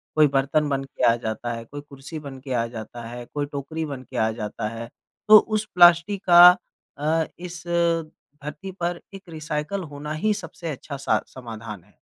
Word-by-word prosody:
कोई 155 -1 +6
बर्तन 145 +2 +1
बन 135 -1 -1
के 135 -1 -7
आ 115 - +4
जाता 115 +2 -3
है, 115 0 -7
कोई 145 +5 -8
कुर्सी 145 +2 -9
बन 140 -3 -9
के 130 0 -5
आ 115 -2 +1
जाता 110 +2 -8
है, 120 +1 -8
कोई 145 +3 -3
टोकरी 150 +3 -5
बन 140 -3 -6
के - - -9
आ 110 - +2
जाता 105 -1 -4
है, 115 +1 -7 0.4
तो 215 0 +11
उस 215 0 -2
प्लास्टिक 175 +3 +6
का 175 +1 +10 0.4
अ, 155 +2 +1
इस 175 -1 -8 0.8
धरती 150 +6 -6
पर 175 -1 -3
एक 195 -2 -11
रिसाइकल 155 +4 -3
होना 145 +1 -7
ही 215 +2 +2
सबसे 170 -3 -7
अच्छा 140 +1 -7
सा - - +1
समाधान 115 -6 -9
है। 105 - -26
145 Hz, 190 wpm, -24 LUFS, 125-170 Hz, 0.8 s, तो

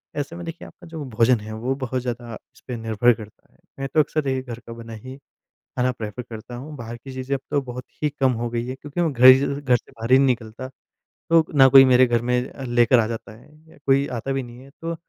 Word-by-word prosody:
ऐसे 145 +3 -4
में 175 - -7
देखिए 165 +1 -7
आपका 175 - -15
जो 160 -2 -7
भोजन 115 +1 +3
है 110 +1 -8
वो 120 +4 -2
बहुत 130 -2 -3
ज़्यादा 120 -1 -5 0.2
इसपे 125 - -8
निर्भर 115 +2 +2
करता 110 -2 -13
है। - - -29 0.2
मैं 135 - -2
तो 155 - +3
अक्सर 150 0 +1
ये 135 - +1
ही 130 - -2
घर 120 -2 -8
का 115 - -7
बना 115 -1 -10
ही 130 +5 -9 0.4
खाना 125 +1 -2
प्रेफर 110 -1 -6
करता 115 +1 -9
हूँ। 145 +5 -8
बाहर 120 -1 -7
की 130 +3 -11
चीज़ें 130 +1 -2
अब 135 - -5
तो 145 - +2
बहुत 125 -1 -8 0.2
ही 150 - +3
कम 135 -2 +1
हो 120 - -2
गई 120 0 -3
है 130 - -4
क्योंकि 145 +5 -5
मैं 165 - +1
घर 125 0 +3
ही 130 0 +10 0.2
घर 130 -3 +3
से 120 - -5
बाहर 115 +2 -6
ही 130 - +8
नहीं 135 - +4
निकलता। 120 0 -3 0.6
तो 165 -1 +6
ना 135 0 +8
कोई 135 0 +9
मेरे 130 0 +6
घर 120 -1 +1
में 125 +1 -1 0.2
लेकर 120 +1 +4
आ 110 - +1
जाता 115 -1 -6
है 150 +5 -20 0.2
या - - -18
कोई 140 +1 +3
आता 135 +4 -4
भी 135 -1 -1
नहीं 120 0 -12
है। 135 - -15
तो 165 0 -3
125 Hz, 260 wpm, -23 LUFS, 115-135 Hz, 0.6 s, ही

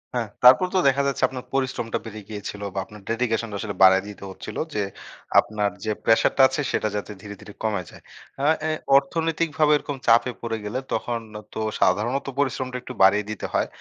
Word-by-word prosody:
হ্যাঁ 120 -2 -1 0.2
তারপর 130 +9 +8
তো - - +5
দেখা 140 +1 +3
যাচ্ছে 140 - -2
আপনার 130 -1 -8
পরিশ্রমটা 130 -4 -1
বেড়ে 110 -1 -8
গিয়েছিলো 105 -1 -6
বা - - 0
আপনার 105 -1 -13
dedication 115 -1 0
টা - - -5
আসলে 100 -2 -4
বাড়ায় 95 0 +7
দিতে 105 -1 -10
হচ্ছিলো - - -6
যে 105 - 0 0.6
আপনার 105 -1 0 0.2
যে 110 - 0
প্রেশারটা 115 +4 +3
আছে 130 +2 -2
সেটা - - 0
যাতে 105 0 -4
ধীরে, 100 0 -8
ধীরে 105 - -11
কমে 105 -4 0
যায়। - - -15 0.4
আ - - +2 0.2
অ্যা 155 +1 -1 0.3
অর্থনৈতিকভাবে 160 +1 +1
এরকম 145 -1 -5
চাপে 115 +2 +5
পড়ে 115 -1 -2
গেলে 110 +5 -2
তখন 120 -1 -1 0.3
তো - - -5 0.2
সাধারণত 110 +9 +2
পরিশ্রমটা 130 -2 -1
একটু 125 - -8
বাড়িয়ে 100 +2 +5
দিতে 110 - -5
হয়। - - +1
115 Hz, 185 wpm, -24 LUFS, 105-130 Hz, 0.6 s, তারপর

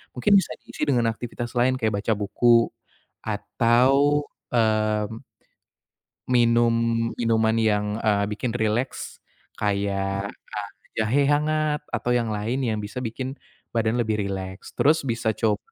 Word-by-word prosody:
Mungkin 125 +10 +2
bisa - - -4
diisi - - -6
dengan 120 -5 +2
aktivitas 120 +1 -6
lain 125 +2 +3
kayak 110 -4 0
baca 110 - +2
buku 115 +3 +3 0.5
atau, 130 +7 +2 0.3
mmm, 110 -2 +1 1.2
minum-minuman 115 -1 +2
yang, 105 -1 +2 0.2
eee, 100 -2 +2
bikin 115 +3 -2
rileks 110 +2 -2 0.4
kayak, 100 -1 -1 0.4
eee, - - -33
jahe 125 +7 +2
hangat 150 +1 +1
atau 120 +1 -2
yang 120 -2 +1
lain 110 +5 -2
yang 110 -4 0
bisa 105 +5 -6
bikin 130 +3 -4 0.4
badan 115 0 +1
lebih 110 -2 0
rileks. 95 0 -6
Terus 155 +3 +4
bisa 115 -2 0
coba, 105 -3 +1
115 Hz, 120 wpm, -24 LUFS, 105-125 Hz, 1.2 s, Terus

